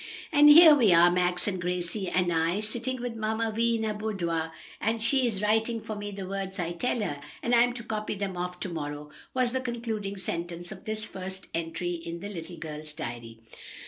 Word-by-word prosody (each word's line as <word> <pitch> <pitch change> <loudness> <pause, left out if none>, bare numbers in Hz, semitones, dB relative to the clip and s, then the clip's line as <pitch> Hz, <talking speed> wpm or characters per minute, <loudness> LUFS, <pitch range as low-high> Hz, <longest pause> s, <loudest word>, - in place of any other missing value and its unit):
"And 295 -1 +7
here 315 +1 +11
we 240 -9 +5
are 175 +1 +7
Max 180 +1 +1
and 185 -3 -1
Gracie 180 +2 -2
and 180 -1 +1
I 165 +4 +1
sitting 240 +4 -4
with 245 -2 -3
Mamma 220 +1 -1
Vi 230 +1 +2
in 225 - -1
her 215 -1 0
boudoir, 170 -7 -2 0.3
and 225 +1 0
she 260 +1 +3
is 210 -3 -3
writing 225 +2 +2
for 215 0 -6
me 205 0 -5
the 195 -1 -6
words 195 0 -4
I 170 -2 -2
tell 235 +7 -1
her, 145 -8 -3 0.2
and 240 - +1
I'm 240 +1 +5
to 240 -1 -7
copy 215 -1 -3
them 195 -2 -3
off 180 0 -4
to 190 - -2
morrow," 150 -2 -5 0.2
was 255 -2 +2
the 260 +1 -1
concluding 225 -5 -3
sentence 175 -1 -5
of - - -10
this 215 0 -3
first 190 -2 -8
entry 165 +2 -2
in 170 0 -6
the 200 +3 -6
little 170 -3 -7
girl's 155 -1 -7
diary. 115 -1 -7
195 Hz, 210 wpm, -28 LUFS, 175-225 Hz, 0.3 s, here